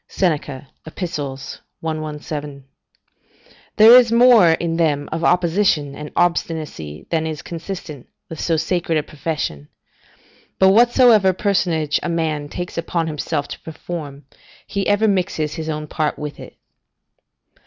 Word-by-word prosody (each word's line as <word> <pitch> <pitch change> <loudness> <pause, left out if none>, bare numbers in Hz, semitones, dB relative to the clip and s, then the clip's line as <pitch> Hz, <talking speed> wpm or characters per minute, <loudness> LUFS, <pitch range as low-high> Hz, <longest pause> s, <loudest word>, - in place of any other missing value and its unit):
Seneca, 145 -7 -2 0.2
Ep., 160 - -11
117.] 150 -1 -6 1.1
there 225 +3 +9
is 245 -2 +6
more 230 -8 +6
in 165 0 -2
them 145 -4 +1
of 165 +1 -3
opposition 170 -5 +2
and 150 +1 -8
obstinacy 155 - -2
than 160 -1 0
is 155 -3 -5
consistent 165 -5 -7 0.2
with 160 - -9
so 165 -2 0
sacred 170 0 -1
a 150 - 0
profession; 145 - -4 0.9
but 190 - +5
whatsoever 230 -2 +5
personage 175 -6 0
a - - -3
man 155 -3 -2
takes 175 +1 -5
upon 170 0 -2
himself 150 -1 -3
to - - -7
perform, 150 -4 -8 0.4
he 200 -1 -3
ever 205 +2 +3
mixes 180 -6 -1
his 160 -2 -5
own 155 -1 -3
part 150 0 -2
with 150 -1 -7
it. - - -12
160 Hz, 130 wpm, -20 LUFS, 150-180 Hz, 1.1 s, there